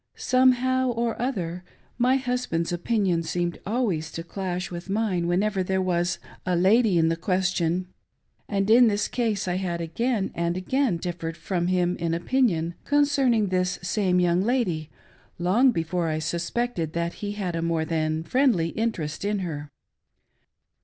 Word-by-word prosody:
Somehow 255 0 +3
or 235 -1 -1
other, 180 -9 -2 0.4
my 250 +2 +4
husband's 245 -11 -1
opinion 180 -2 +1
seemed 175 +1 -2
always 200 -9 -1
to 165 - -5
clash 180 0 -4
with 175 +1 -7
mine 195 -5 0
whenever 195 +3 +1
there 190 +1 0
was 175 -1 0 0.3
a 180 -1 0
lady 195 +2 +4
in 165 -1 +3
the 165 - +1
question; 180 0 0 0.6
and 195 -1 0
in 240 +1 +7
this 205 -1 +1
case 225 -6 -1
I 180 0 0
had 175 -3 -2
again 200 +6 -1
and 170 +1 -1
again 245 +1 0
differed 165 -2 -5
from 175 +1 -2
him 180 -1 +1
in 165 -1 -1
opinion 170 -4 +1
concerning 275 -7 +2
this 180 0 0
same 185 -1 +1
young 175 0 +3
lady, 190 - 0 0.5
long 210 +10 +4
b^ore 165 -2 -1
I 155 - -1
suspected 170 +3 -2
that 170 0 -1
he 205 -1 -3
had 190 -5 -3
a 165 - -1
more 165 -1 0
thfn 155 0 -1
friendly 235 - +2
interest 175 -9 -3
in 205 +1 0
her. 150 -3 -5
180 Hz, 155 wpm, -25 LUFS, 170-225 Hz, 0.6 s, in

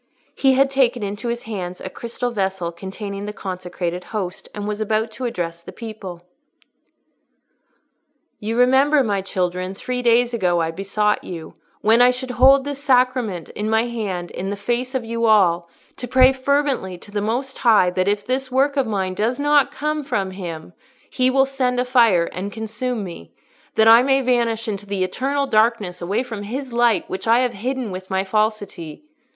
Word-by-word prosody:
He 270 -1 +3
had 270 +1 +3
taken 250 -4 +2
into 205 +3 -4
his 235 0 -3
hands 185 -5 -5
a - - -6
crystal 235 +5 -4
vessel, 190 -5 -2
containing 200 +3 -6
the 210 - -5
consecrated 180 -2 -5
Host, 190 -5 -5
and 205 0 -5
was 210 0 -3
about 215 +1 0
to 255 +3 -6
address 170 -8 -3
the - - -10
people. 205 -7 -8 2.2
"You 220 +2 -3
remember, 265 +3 +4
my 200 -4 0
children, 185 0 -2
three 250 +5 -3
days 240 0 +3
ago 180 -6 +1
I 165 -1 0
besought 200 +4 0
you, 165 -3 -8 0.3
when 225 +3 +4
I 245 - +7
should 250 0 -3
hold 265 +2 +6
this 285 0 -5
Sacrament 250 - +1
in 210 +1 -4
my 220 +1 +2
hand 200 -7 -4
in 190 +2 -4
the 200 - -2
face 245 +5 -2
of 250 -3 -1
you 230 0 -1
all, 175 -5 +3 0.3
to 250 - -5
pray 255 +1 +5
fervently 265 -8 0
to 205 - -13
the 205 0 -2
Most 250 +6 -2
High 215 -7 +4
that 185 +1 0
if 205 0 0
this 260 +1 -2
work 275 +2 +2
of 270 -3 +2
mine 190 -3 -1
does 225 +7 -1
not 290 -1 +3
come 300 +1 -2
from 240 -9 -2
Him, 175 -3 -7 0.4
He 255 0 +3
will 270 +1 +4
send 255 -2 -1
a 250 - +1
fire 230 -9 +4
and 195 +3 -4
consume 220 +1 -3
me, 170 - -9 0.4
that 220 - +5
I 230 +1 +9
may 270 +1 +3
vanish 235 -3 0
into 205 -1 -4
the 195 -2 -1
eternal 275 +9 -1
darkness 215 -6 +1
away 200 +8 -1
from 225 -5 -6
His 255 +5 -5
light 235 -5 +2
which 190 +3 -5
I 230 +2 +5
have 250 -1 0
hidden 250 +1 -3
with 185 0 -7
my 190 0 0
falsity. 205 - -2
220 Hz, 185 wpm, -21 LUFS, 190-250 Hz, 2.2 s, I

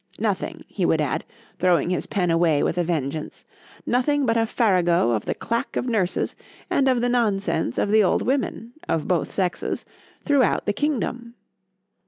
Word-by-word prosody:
Nothing,—he - - -3
would - - +3
add, - - -1 0.4
throwing 180 -1 +2
his 180 - -2
pen 180 -4 0
away 165 -3 +3
with 180 - 0
a - - +2
vengeance,—nothing 175 - -2
but 230 -2 +2
a 225 -1 +2
farrago 180 - +2
of 110 -3 -1
the - - -2
clack 230 0 -3
of - - -1
nurses, 210 -7 -1 0.4
and 270 - +3
of 255 -2 +3
the 245 - +1
nonsense 200 - 0
of 205 - +1
the 215 0 +5
old 185 - +2
women 245 -3 -2 0.2
(of 160 - 0
both 175 -5 0
sexes) 180 -3 -2 0.4
throughout 275 -7 +2
the 205 - +1
kingdom. 245 -2 -2
205 Hz, 160 wpm, -23 LUFS, 175-245 Hz, 0.4 s, the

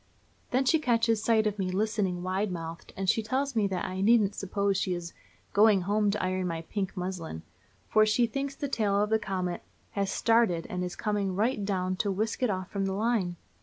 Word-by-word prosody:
Then 260 +2 +1
she 320 +5 +4
catches 230 -5 +2
sight 220 -2 +3
of 210 -1 -1
me 185 -1 0
listening 195 -2 -1
wide 190 +2 -1
mouthed, 165 -1 -6
and 195 0 -2
she 225 - +3
tells 265 +4 -1
me 210 -3 +3
that 185 -2 -2
I 185 +1 -3
needn't 210 -1 +4
suppose 200 0 -1
she 185 -1 0
is 170 -1 -6 0.4
"going 205 -1 +5
home 205 +3 +1
to 200 - -1
iron 185 0 0
my 165 -1 -3
pink 195 +2 -4
muslin," 180 - -4 0.4
for 215 - +5
she 215 +3 +3
thinks 275 +4 -3
the 285 - -3
tail 210 -6 +1
of 210 - -2
the 220 - +4
comet 185 -3 -3 0.3
"has 200 -1 -1
started, 225 -9 +2
and 180 0 -2
is 180 -1 -4
coming 205 -3 -1
right 220 +2 +1
down 185 -2 -1
to 205 - 0
whisk 215 +5 -2
it 250 - +2
off 185 -2 -3
from 195 -1 -1
the 190 - -1
line." 205 -4 0
200 Hz, 210 wpm, -29 LUFS, 185-220 Hz, 0.4 s, going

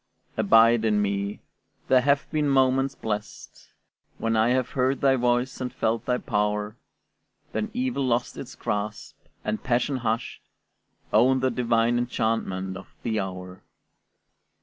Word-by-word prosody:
Abide 115 +2 +5
in 105 -2 +2
me: 100 0 -2 0.5
there 130 -1 +5
have 140 +1 +2
been 150 -2 +1
moments 135 0 +2
blest 105 -1 -6 0.5
When 115 0 0
I 110 +2 +3
have 125 0 +1
heard 130 +1 +1
thy 135 -1 +4
voice 125 +1 0
and 125 - -3
felt 115 +1 -1
thy 125 -1 +1
power; 105 -1 -1 0.8
Then 215 - -2
evil 250 - -1
lost 120 0 0
its - - -8
grasp, 105 +1 -4 0.3
and 105 0 -2
passion, 125 +3 0
hushed, 115 -1 -2 0.7
Owned 130 +4 +4
the 130 0 +2
divine 120 0 +2
enchantment 110 -6 -2
of 95 - -14
the 110 -2 0
hour. 90 -1 -6
120 Hz, 135 wpm, -25 LUFS, 105-130 Hz, 0.8 s, Abide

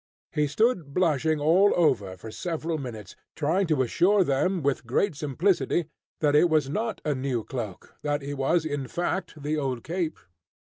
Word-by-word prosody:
He 150 -1 +1
stood 170 - 0
blushing 160 -3 +2
all 175 +7 +4
over 115 - +1
for 110 +4 -9
several 165 +2 -3
minutes, 110 -8 -7 0.2
trying 170 +6 +1
to 150 -5 +2
assure 185 - +3
them 170 +4 0
with 135 -3 0
great 175 - +1
simplicity 160 +3 0 0.3
that 145 -2 +3
it 170 +4 +5
was 155 -4 +2
not 220 +5 -2
a 150 - +1
new 130 -3 -2
cloak, 110 -8 -6
that 145 -1 -1
it 140 +1 -4
was 150 +4 +1
in 145 -4 -3
fact 175 -1 -3
the 150 +1 -1
old 130 -5 -2
"cape." 170 -1 -2
150 Hz, 170 wpm, -26 LUFS, 135-175 Hz, 0.3 s, it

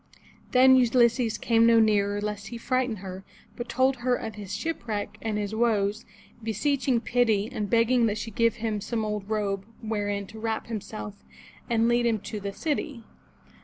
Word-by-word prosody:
Then 260 +1 +6
Ulysses 235 -1 +3
came 230 -1 +3
no 230 -1 +6
nearer 205 -2 +2
lest 205 -1 -4
he 235 - -6
frighten 255 0 0
her, 190 0 -7 0.3
but 240 0 -6
told 260 +2 +2
her 245 +1 +1
of 220 -2 -5
his 205 -2 -6
shipwreck 215 -9 -4
and 220 -2 -2
his 205 0 -3
woes, 220 -1 +1 0.4
beseeching 255 +3 0
pity, 225 -5 +2
and 215 -5 -3
begging 235 +1 +3
that 210 0 -1
she 225 +1 -5
give 230 +1 +2
him 215 -2 -2
some 220 +1 -2
old 210 -1 -4
robe 200 -3 -1 0.2
wherein 205 -2 -2
to 220 +2 -11
wrap 220 0 -2
himself, 215 -2 -6 0.6
and 230 -1 +3
lead 240 0 +3
him 225 -2 +2
to 215 0 -5
the 200 0 -4
city. 285 +2 -3
225 Hz, 170 wpm, -27 LUFS, 210-240 Hz, 0.6 s, Then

